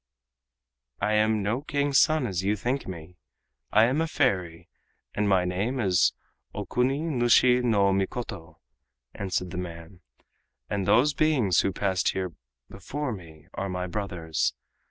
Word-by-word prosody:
"I 105 - 0
am 110 -1 +2
no 110 +6 -1
King's 145 -2 +1
son 155 -4 +3
as 95 -6 -2
you 100 +2 +1
think 125 +6 -2
me. 90 -1 -9 0.5
I 110 - +5
am 135 +7 +1
a 165 - 0
fairy, 95 - -1 0.5
and 105 -1 0
my 95 -2 +3
name 100 +9 -1
is 95 -6 +3 0.4
Okuni 130 +3 0
nushi 125 -4 +4
no 100 -5 +3
Mikoto," 95 -3 -4 0.6
answered 90 -2 -3
the - - -6
man, 85 0 -8 0.7
"and 100 -2 -2
those 125 +8 +4
beings 135 - +2
who 95 - +1
passed 95 0 0
here 95 -2 -3 0.3
before 130 - -5
me 80 -7 -10
are 100 0 -3
my 90 0 -3
brothers. 90 -4 -2
100 Hz, 140 wpm, -26 LUFS, 90-125 Hz, 0.7 s, I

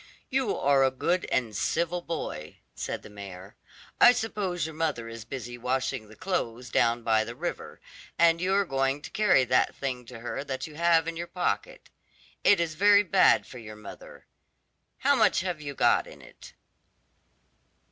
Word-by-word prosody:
"You 260 -5 0
are 140 -1 +3
a 135 - +4
good 175 +7 -1
and 115 -4 0
civil 170 - -1
boy," 80 - -6 0.2
said - - -5
the - - -11
mayor. 95 -2 -10 0.4
"I 245 - +8
suppose 195 -8 -2
your 160 - -6
mother 155 -7 -2
is 115 -1 -8
busy 120 -1 -7
washing 125 -2 -2
the 110 - -14
clothes 125 - -3
down 120 0 +2
by 110 -1 +3
the 120 +2 -8
river, - - -5 0.4
and 170 0 +4
you 185 +1 0
are 200 0 +2
going 135 -1 -1
to - - -8
carry 210 -10 +4
that 125 0 +2
thing 125 -3 -4
to 115 -2 -10
her 120 +3 -4
that 135 -2 -4
you 155 - -11
have 165 0 +3
in 170 -1 -4
your 170 +1 -4
pocket. - - -3 0.5
It 200 - +5
is 165 -2 -1
very 205 +4 +5
bad 190 0 +4
for 125 - -11
your 110 -2 -10
mother. 105 -1 -12 0.7
How - - +3
much - - +3
have 180 -4 -4
you 145 -2 -6
got - - +3
in - - -13
it?" - - -15
140 Hz, 175 wpm, -27 LUFS, 120-175 Hz, 0.7 s, I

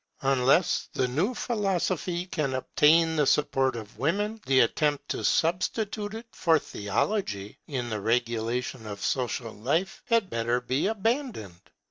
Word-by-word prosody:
Unless 135 +5 +3
the 130 - +1
new 170 - 0
philosophy 185 - -1
can 150 -7 -2
obtain 160 +5 +3
the 145 -2 +3
support 135 -3 +2
of 110 -1 -9
women, 205 +9 -1
the 130 -1 +5
attempt 145 +4 +1
to - - -3
substitute 205 +5 0
it 225 +1 -7
for 165 -2 +3
theology 105 - -2
in 130 -4 -3
the 105 -2 -2
regulation 115 +1 -1
of 100 -1 -6
social 120 -3 -2
life 150 - -1
had 230 -5 +2
better 115 +1 0
be 130 +7 0
abandoned. 220 - -2
145 Hz, 135 wpm, -27 LUFS, 120-190 Hz, -, the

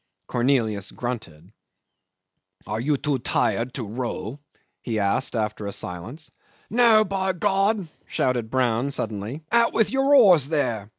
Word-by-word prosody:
Cornelius 115 -5 0
grunted. 105 -8 -6 1.1
"Are 110 +2 -3
you 145 +4 +1
too 140 -1 -1
tired 120 +1 0
to 125 - -3
row?" 120 +3 -5 0.4
he 115 +1 -3
asked 105 +6 0
after 105 -2 -2
a - - -3
silence. 115 - -6 0.4
"No, 225 -2 +5
by 190 -1 -1
God!" 195 +1 +1 0.2
shouted 125 -4 -1
Brown 125 +1 +1
suddenly. 115 +2 -4
"Out 235 0 +3
with 225 - +2
your 270 +2 +3
oars 180 - +6
there." 120 -10 -1
130 Hz, 130 wpm, -24 LUFS, 110-180 Hz, 1.1 s, oars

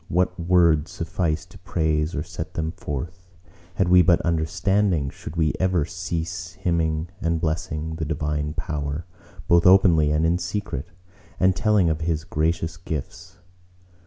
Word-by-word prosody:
What 90 +1 0
words 85 -3 +3
suffice 85 -2 -2
to - - -16
praise 80 -1 -1
or 75 - -2
set 80 -1 -7
them 80 -1 -1
forth? 85 +4 -7 0.4
Had 95 - +1
we 90 0 +7
but 85 -1 +4
understanding, 85 -1 +1
should 75 - -9
we 80 -2 +2
ever 90 -5 +2
cease 85 +1 -4
hymning 80 -2 -1
and 85 -3 0
blessing 80 0 -2
the 80 - -2
Divine 75 -1 -2
Power, 75 +1 -3 0.4
both 85 0 +5
openly 90 -5 +6
and 75 +1 +2
in 85 +2 +2
secret, 90 -6 -4 0.5
and 95 0 +4
telling 105 -1 +3
of 80 0 0
His 80 -1 -1
gracious 80 0 -1
gifts? 90 +3 -6
85 Hz, 145 wpm, -24 LUFS, 80-90 Hz, 0.5 s, we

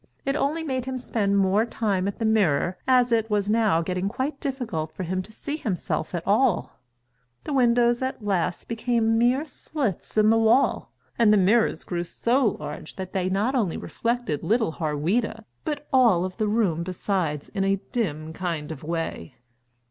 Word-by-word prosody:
It 275 +1 0
only 300 +3 0
made 260 -5 -2
him 260 0 -3
spend 205 -5 0
more 195 +2 +3
time 205 -5 -1
at 200 - -3
the 225 - -2
mirror, 185 -6 +2
as 250 -2 +4
it 225 -1 +2
was 205 -1 +1
now 215 -7 +3
getting 185 +3 -1
quite 275 +6 -3
difficult 230 - -3
for 185 - -4
him 185 +2 -2
to 200 - -11
see 290 +7 -5
himself 185 - -2
at 170 - -4
all. 215 -1 +1 0.6
The 295 - -4
windows 240 -2 +3
at 260 -4 -3
last 180 -3 -1
became 230 -1 +1
mere 250 +5 +2
slits 275 - -4
in 215 0 +5
the 225 - +4
wall, 225 +4 +3 0.3
and 225 -3 +6
the 210 - +5
mirrors 210 +4 +3
grew 175 -1 -3
so 235 +5 +1
large 150 +1 -7
that 185 -1 -6
they 185 -1 0
not 205 +7 +1
only 215 -10 0
reflected 235 - -2
little 220 -4 +1
Harweda 170 +9 -1 0.2
but 295 -2 -3
all 230 -9 +5
of 185 -1 -6
the 215 -2 0
room 205 -7 +1
besides 175 -4 -2
in 195 -2 -2
a 195 0 +3 0.2
dim 160 -9 -2
kind 165 -4 -3
of 155 - -7
way. 165 - -4
210 Hz, 180 wpm, -25 LUFS, 180-240 Hz, 0.6 s, and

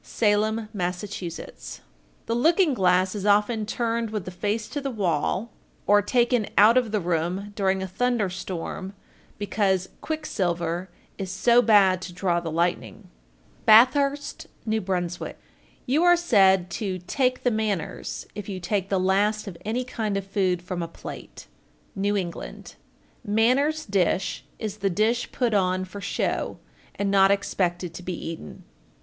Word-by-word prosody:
Salem, 215 +1 +1
Mass. 180 -2 -2
1408. 185 -5 -7 0.5
The 230 - -1
looking 320 +6 +3
glass 185 -3 +2
is 205 -2 -4
often 210 +1 +2
turned 230 0 -1
with 210 -4 -4
the 185 - -6
face 210 +4 -2
to 290 - -4
the 275 - -2
wall, 195 - -1 0.3
or 205 0 +5
taken 240 +1 +2
out 215 +3 +7
of 245 -4 +2
the 215 - +1
room 180 +3 -2
during 190 -1 +1
a - - -3
thunder 235 +2 0
storm, 185 +1 -5 0.4
because 195 -2 0
"quick 315 -1 -4
silver 175 - -2 0.3
is 190 -1 -4
so 235 +6 +4
bad 195 -5 +5
to 180 -1 -7
draw 175 -1 0
the 170 -1 -5
lightning." 160 - -2 0.6
Bathurst, 275 +6 +4 0.2
N.B. 220 0 +1
1409. 180 -3 -3 0.5
You 285 +6 +2
are 350 0 +6
said 190 - +4
to 190 0 -3
"take 255 +5 0
the 245 - +3
manners" 205 -4 -3
if 205 0 -7
you 190 -2 -4
take 190 +2 -2
the 195 - +1
last 205 +3 +1
of 190 - -6
any 230 +5 -1
kind 220 -5 -2
of 195 - -4
food 190 -3 0
from 180 -1 -4
a 170 - -3
plate. - - -10 0.5
New 205 +1 0
England. 175 -3 -6 0.5
1410. 210 -3 -3
"Manners 280 +8 +2
dish" 195 -1 0
is 215 -2 -5
the 195 -1 0
dish 220 +6 0
put 240 -3 0
on 185 -2 +1
for 200 +2 -9
show, - - -2 0.4
and 200 -1 -1
not 195 -1 +5
expected 180 -3 0
to - - -8
be 180 0 -4 0.2
eaten. 165 - -9
200 Hz, 155 wpm, -25 LUFS, 185-225 Hz, 0.6 s, out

